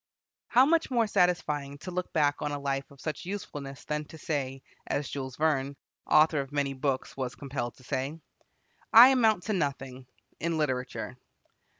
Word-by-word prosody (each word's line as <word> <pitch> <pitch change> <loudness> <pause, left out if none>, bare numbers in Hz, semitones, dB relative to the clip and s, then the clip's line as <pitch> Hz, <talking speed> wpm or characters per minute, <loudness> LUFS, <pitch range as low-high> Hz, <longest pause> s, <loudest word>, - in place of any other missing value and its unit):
How 255 +2 +6
much 330 +2 +2
more 240 -3 +2
satisfying 150 -8 +1
to 170 +5 -8
look 180 0 -3
back 145 -3 +1
on 150 - -1
a 145 - -2
life 140 -1 -2
of 140 - -17
such 155 +2 -4
usefulness 145 -8 -6
than 150 0 -2
to 160 - -12
say, 135 -5 -3 0.2
as 145 - -1
Jules 130 -2 -5
Verne, 140 -3 0 0.3
author 155 -1 +5
of 135 0 -8
many 140 -1 0
books, 135 0 -2
was 130 -2 -4
compelled 135 -4 -4
to 130 - -18
say, 135 +5 -3 0.7
"I 235 +3 +11
amount 225 -8 +3
to 215 +4 -1
nothing... 135 -6 -3 0.3
in 165 +1 -1
literature." 130 -3 -2
145 Hz, 170 wpm, -29 LUFS, 135-170 Hz, 0.7 s, I